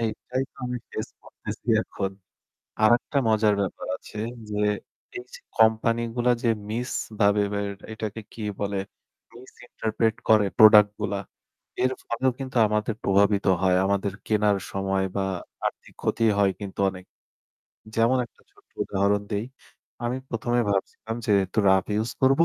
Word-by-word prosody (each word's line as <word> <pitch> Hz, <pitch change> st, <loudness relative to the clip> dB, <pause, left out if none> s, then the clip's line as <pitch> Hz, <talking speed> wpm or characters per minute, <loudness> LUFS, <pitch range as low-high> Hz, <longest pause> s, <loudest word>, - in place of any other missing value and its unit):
এইটাই 125 Hz, +3 st, -2 dB
তো -, -, -44 dB
আমি 125 Hz, 0 st, -2 dB
ফেস -, -, -4 dB
করতেছি -, -, -9 dB, 0.2 s
এখন। 95 Hz, -1 st, -4 dB, 0.7 s
আরেকটা 120 Hz, +6 st, +3 dB
মজার 110 Hz, -1 st, +4 dB
ব্যাপার 95 Hz, -, -4 dB
আছে। -, -, -12 dB, 0.3 s
যে 105 Hz, -, -3 dB, 0.6 s
এই 125 Hz, -, -7 dB
যে -, -, -9 dB, 0.2 s
কোম্পানিগুলা 115 Hz, +2 st, +3 dB
যে -, -, +2 dB, 0.2 s
মিসভাবে 110 Hz, -3 st, 0 dB
বা 100 Hz, -, 0 dB, 0.3 s
এটাকে 110 Hz, 0 st, -5 dB
কি 115 Hz, -, -9 dB, 0.2 s
বলে? 100 Hz, -1 st, -1 dB, 0.6 s
Misinterpret 115 Hz, -2 st, -3 dB
করে 110 Hz, -2 st, +6 dB
প্রোডাক্টগুলা, 105 Hz, -2 st, +6 dB, 0.7 s
এর 130 Hz, -, +3 dB
ফলেও 130 Hz, +2 st, 0 dB
কিন্তু 130 Hz, -2 st, -4 dB
আমাদের 105 Hz, +1 st, -1 dB
প্রভাবিত 100 Hz, +1 st, +3 dB, 0.2 s
হয় 95 Hz, -1 st, +3 dB
আমাদের 100 Hz, 0 st, 0 dB
কেনার 105 Hz, -2 st, +3 dB
সময় 95 Hz, 0 st, 0 dB
বা 100 Hz, -, +1 dB, 0.5 s
আর্থিক -, -, -8 dB
ক্ষতি 115 Hz, -, 0 dB, 0.2 s
হয় 100 Hz, -1 st, +4 dB
কিন্তু 100 Hz, -1 st, -7 dB
অনেক। 95 Hz, -1 st, -10 dB, 0.9 s
যেমন 120 Hz, +3 st, +4 dB
একটা -, -, -30 dB
ছোট্ট -, -, -27 dB
উদাহরণ 100 Hz, +1 st, +1 dB
দেই। 105 Hz, +2 st, -1 dB, 0.6 s
আমি 120 Hz, +2 st, 0 dB
১ম 120 Hz, +1 st, -2 dB
এ -, -, +2 dB
ভাবছিলাম 105 Hz, +3 st, -2 dB
যে 105 Hz, -, +3 dB
একটু 95 Hz, -, -6 dB
rough 95 Hz, +1 st, +3 dB
use 115 Hz, +3 st, -2 dB
করবো। 135 Hz, +5 st, +5 dB
110 Hz, 140 wpm, -25 LUFS, 100-115 Hz, 0.9 s, করে